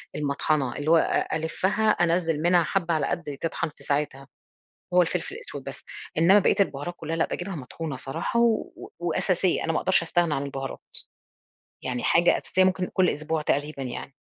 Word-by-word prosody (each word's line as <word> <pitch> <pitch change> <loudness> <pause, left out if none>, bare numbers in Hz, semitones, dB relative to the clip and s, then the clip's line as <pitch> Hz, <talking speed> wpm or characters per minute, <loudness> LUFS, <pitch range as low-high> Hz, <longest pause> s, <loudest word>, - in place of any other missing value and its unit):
المطحَنَة 140 -2 0
اللي 150 +2 0
هو 165 - +7
أ 160 - +1
ألِفَّها 185 +7 0
أنزِّل 170 -5 +2
منها 175 +1 +4
حبَّة 170 0 0
على 150 -3 +1
قدي 155 -5 -3
تطّحن 165 0 -2
في - - -15
ساعتها، 140 -1 -2 0.7
هو 180 - +6
الفلفل 180 - -2
الأسود 470 +1 -8
بس، - - -8 0.3
إنَّما 180 +6 +6
بقية - - +3
البُهارات 175 -3 0
كلها 165 +1 -4
لأ 165 - +2
باجيبها 185 0 -4
مطحونة 145 +2 -6
صراحة، 135 - -2
و 235 -2 0
وأساسية 180 +1 +1
أنا 165 - 0
ما - - +1
اقدرش 190 0 +3
أستغنى 170 -1 +1
عن 140 - -1
البُهارات، 135 -1 -5 1.0
يعني 125 -1 -3
حاجة 175 +1 +4
أساسية 185 - +1
ممكن 185 -1 +1
كل 185 -1 +3
أسبوع 155 +1 -2
تقريبًا 145 -1 -1
يعني. 130 +1 -6
165 Hz, 170 wpm, -26 LUFS, 145-180 Hz, 1.0 s, هو